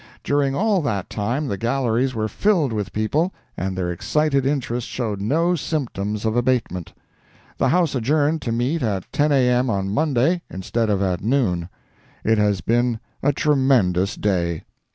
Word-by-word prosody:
During 140 -1 +1
all 205 +1 +2
that 100 - -2
time 120 +8 -1
the 100 -6 -3
galleries 125 +1 0
were 110 -1 0
filled 165 - +1
with 105 -2 -3
people, 145 - 0 0.2
and 95 +1 -3
their 90 -1 -1
excited 140 - +1
interest 125 -4 -1
showed 110 -6 -3
no 165 - +2
symptoms 110 - -3
of 110 0 0
abatement. 120 -8 0 0.7
The - - +3
House 170 -3 +2
adjourned 145 +5 +1
to 120 - -3
meet 125 +8 0
at 100 -5 -1
10 150 +1 +2
A. 130 -3 +4
M. 125 +1 +2
on 95 -2 -1
Monday, 155 +5 +2
instead 110 +4 -2
of 100 -1 +1
at 90 -2 -1
noon. 100 -9 +1 0.5
It 110 0 +2
has 105 -3 +2
been 120 0 +1 0.2
a 145 - +3
tremendous 130 -11 +2
day. 85 -5 -1
120 Hz, 160 wpm, -22 LUFS, 105-145 Hz, 0.7 s, A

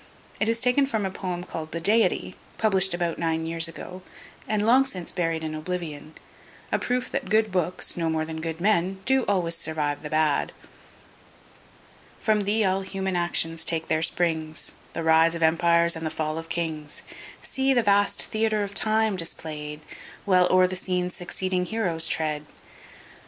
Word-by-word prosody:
It 220 - +1
is 230 0 +1
taken 250 +3 +3
from 220 -7 -1
a 190 - -2
poem 180 -2 -4
called 160 -3 -6
the 170 - -3
Deity, 220 +6 +2 0.2
published 190 -4 +3
about 175 -1 -2
nine 160 -1 0
years 165 0 +2
ago, 180 +3 -8 0.5
and 215 -1 0
long 255 +4 +6
since 185 -10 -6
buried 165 -3 -1
in 155 -1 -3
oblivion; 155 -2 -5 0.6
a - - +1
proof 250 0 -1
that - - -3
good 215 0 +3
books, 180 -1 -1
no 165 -2 -1
more 160 0 0
than 160 0 -6
good 165 0 -4
men, 190 -1 +1
do 265 0 +3
always 175 -4 +1
survive 155 -3 -2
the 150 - -6
bad. 155 -2 +2 1.7
From 215 -3 +1
Thee[*] 210 +1 +2
all 190 0 +2
human 190 -1 -3
actions 165 -2 +1
take 165 -1 -1
their 155 - +2
springs, 160 -2 -1 0.2
The 165 - -3
rise 160 +1 +4
of 165 - -2
empires 170 +1 +4
and 165 - -6
the 160 - -1
fall 155 0 -2
of 165 0 -9
kings! 155 -3 -3 0.4
See 270 0 0
the 245 -3 +3
vast 205 0 +3
Theatre 215 -1 0
of 200 0 -5
Time 220 0 +2
display'd, 155 -3 -4 0.4
While 180 -3 +4
o'er 185 0 +5
the 185 0 -2
scene 180 -1 -1
succeeding 180 +1 -2
heroes 180 -7 0
tread! 150 -1 -1
175 Hz, 170 wpm, -25 LUFS, 160-200 Hz, 1.7 s, long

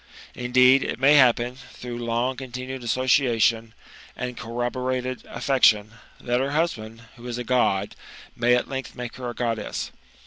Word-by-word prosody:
Indeed, 125 +2 +4
it - - -3
may 135 +3 +5
happen, 125 -2 +4 0.2
through 120 -1 -7
long 120 +3 -1
continued 130 0 -7
association, 120 -2 +1 0.4
and 125 0 -5
corrobated 125 +2 -3
affection, 120 -4 +2 0.3
that 120 0 -1
her 135 +2 -1
husband, 115 -9 -2
who 120 +1 -10
is 120 -1 -4
a 125 - -3
God, 110 -5 +1 0.4
may 120 +1 +3
at 125 - -1
length 135 -1 -6
make 125 -2 -7
her 125 -1 -5
a 120 - -7
Goddess. 115 -3 -3
125 Hz, 145 wpm, -24 LUFS, 115-130 Hz, 0.4 s, may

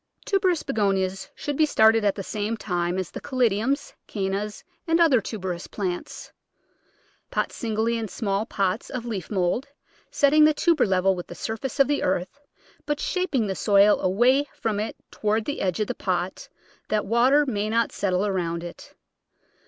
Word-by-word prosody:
Tuberous 370 -5 +1
Begonias 195 -3 -1
should 290 - -4
be 310 +2 +3
started 220 -4 +4
at 200 -1 +2
the 195 - -5
same 215 +3 -3
time 175 -3 -2
as 185 -3 -3
the - - -7
Caladiums, 255 +1 0
Cannas, 200 +1 -3 0.2
and 330 +1 +3
other 295 -9 +5
tuberous 185 -4 -5
plants. 185 -4 -5 1.0
Pot - - -1
singly 230 0 -1
in 225 - -3
small 200 +1 -2
pots 200 +1 -1
of 245 -2 -5
leaf 205 -8 -4
mould, 200 +7 0 0.4
set 285 -1 +3
ting 305 +1 +6
the 305 0 +5
tuber 325 -6 +3
level 190 0 +3
with 175 - -7
the - - -9
surface 230 +5 -4
of 275 - +6
the 290 0 0
earth, 185 +8 -1 0.5
but 295 0 -1
shaping 360 - 0
the 195 - -1
soil 200 +1 +4
away 245 +10 +3
from 215 -2 -1
it 215 - -3 0.2
toward 215 +1 0
the 290 - -3
edge 185 0 -1
of 215 - +1
the - - -3
pot 180 -1 -3 0.4
that 215 -1 0
water 250 +7 +4
may 215 -5 -1
not 230 +1 +1
settle 190 0 0
around 170 -4 -2
it. 175 - -10
215 Hz, 170 wpm, -25 LUFS, 190-255 Hz, 1.0 s, ting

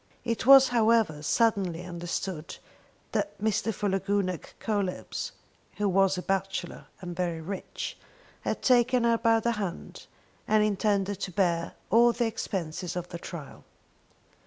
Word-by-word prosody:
It 230 0 -2
was, 270 -1 +9
however, 225 -9 +3
suddenly 185 -1 +1
understood 175 -1 -4 0.5
that - - -2
Mr. 220 +1 0
Philogunac 195 -3 -1
Coelebs, 205 - -2 0.5
who 210 - +1
was 195 0 +3
a 180 - -4
bachelor 195 -2 -3
and 175 -1 -6
very 170 -2 -1
rich, 185 +4 -5 0.5
had - - -3
taken 250 -1 +4
her 230 -1 +3
by 225 -1 +4
the 235 +1 0
hand, 200 -6 -5 0.4
and 215 0 +4
intended 200 -1 0
to 190 - -4
bear 170 -2 0 0.2
all 235 +2 +6
the 240 +1 0
expenses 180 -6 -3
of 180 0 -4
the 170 - -6
trial. 165 -5 -9
195 Hz, 135 wpm, -28 LUFS, 180-225 Hz, 0.5 s, was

